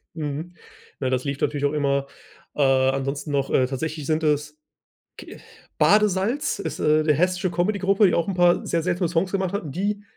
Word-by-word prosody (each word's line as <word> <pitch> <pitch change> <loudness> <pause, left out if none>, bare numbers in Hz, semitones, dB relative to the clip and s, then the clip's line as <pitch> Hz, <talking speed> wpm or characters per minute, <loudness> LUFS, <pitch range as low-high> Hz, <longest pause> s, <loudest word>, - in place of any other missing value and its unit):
Mhm, 155 +3 -5 0.4
ne, 130 -2 -1
das 130 +1 -1
lief 140 0 -3
natürlich 145 -1 -1
auch 145 - 0
immer 140 -2 0 0.5
äh, - - -1
ansonsten 135 +2 +1
noch, 140 -1 -1
äh, 130 -1 +3
tatsächlich 150 +2 -4
sind 160 0 0
es 150 0 0 0.6
ke - - -11 0.4
Badesalz? 205 - +2
Ist, - - -5
äh, 155 0 +3
'ne 155 - +3
hessische 180 +4 0
Comedy 180 +4 -1
Gruppe, 195 +2 +3
die 175 - 0
auch 170 - +1
'n 195 - -1
paar 175 -1 +3
sehr 165 -1 0
seltsame 180 0 0
Songs 170 +3 -1
gemacht 190 -1 -1
hatten. 170 -8 -4
Die 205 +6 -2
160 Hz, 190 wpm, -23 LUFS, 140-185 Hz, 0.6 s, äh